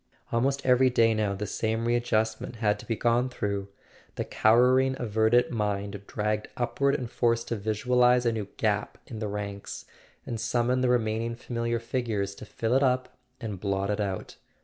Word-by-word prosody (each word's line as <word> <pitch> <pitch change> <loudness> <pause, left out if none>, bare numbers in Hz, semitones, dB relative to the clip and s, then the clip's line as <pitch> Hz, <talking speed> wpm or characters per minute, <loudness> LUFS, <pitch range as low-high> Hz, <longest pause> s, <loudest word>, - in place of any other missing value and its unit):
Almost 135 +4 0
every 130 0 +5
day 115 -2 +4
now 105 -2 0
the 100 +2 -4
same 110 +2 -1
re¬ 120 0 +2
adjustment 110 -1 -1
had 105 -2 +1
to - - -11
be 115 - 0
gone 120 +3 +2
through: 100 -5 -3 0.5
the - - -2
cowering 125 +4 +4
averted 110 +1 +2
mind 100 -3 -2
dragged 105 0 -1
upward 140 +3 +1
and 125 - -3
forced 115 0 0
to 115 - 0
visualize 125 +4 +2
a 120 - +3
new 110 -3 -3
gap 105 -2 0
in 110 - -7
the 110 - -2
ranks, 100 -1 -5 0.4
and 115 - -4
summon 125 +1 +1
the 130 - +2
remaining 115 -1 0
familiar 115 -1 -2
figures 115 -4 -2
to - - -10
fill 115 +1 -2
it 135 - +4
up 130 -1 +1 0.2
and 105 -6 -5
blot 100 +1 -1
it 105 - -2
out. 95 -2 -4
115 Hz, 175 wpm, -27 LUFS, 105-125 Hz, 0.5 s, every